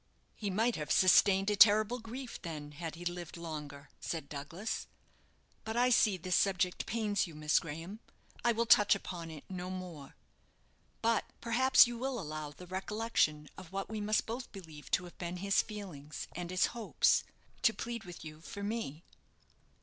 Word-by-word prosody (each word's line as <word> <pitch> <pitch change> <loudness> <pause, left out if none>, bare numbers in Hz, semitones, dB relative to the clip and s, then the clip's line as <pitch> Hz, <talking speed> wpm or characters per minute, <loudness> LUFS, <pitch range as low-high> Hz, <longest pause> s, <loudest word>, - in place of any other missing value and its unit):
"He 205 - -3
might 225 +5 +1
have 150 - -4
sustained 195 +2 +5
a - - +2
terrible 215 +4 +6
grief, 240 +3 -7
then, 150 -4 -6
had 160 +2 -6
he 175 +1 -9
lived 175 -1 -4
longer," 150 -3 -7
said 160 -4 -4
Douglas; 150 +9 -4 0.8
"but 220 +1 -3
I 250 +1 +4
see 215 -5 +4
this 180 +1 -1
subject 185 -2 +1
pains 210 -4 0
you, 165 - -11
Miss 150 0 +3
Graham; 165 +7 -7 0.4
I 240 - +4
will 235 +1 +1
touch 210 -2 +6
upon 175 -4 -6
it 155 -3 -9
no 180 -1 -5
more. 180 -7 -7 0.9
But 230 -1 +2
perhaps 250 +3 +6
you 240 -1 -5
will 260 -1 -2
allow 155 -3 -5
the 165 +5 -12
recollection 185 -5 0
of 175 - -12
what 195 +2 -4
we 215 -1 -3
must 215 +1 +1
both 240 +3 -5
believe 160 -7 -11
to 180 - +2
have 175 - -12
been 175 0 -4
his 200 +2 +3
feelings 165 -10 -7
and 175 0 -4
his 185 0 +3
hopes, 235 -3 +3 0.4
to 260 - +5
plead 235 0 -5
with 175 -3 -10
you 155 0 -9
for 200 +4 -7
me." 200 -8 -3
185 Hz, 175 wpm, -33 LUFS, 165-220 Hz, 0.9 s, terrible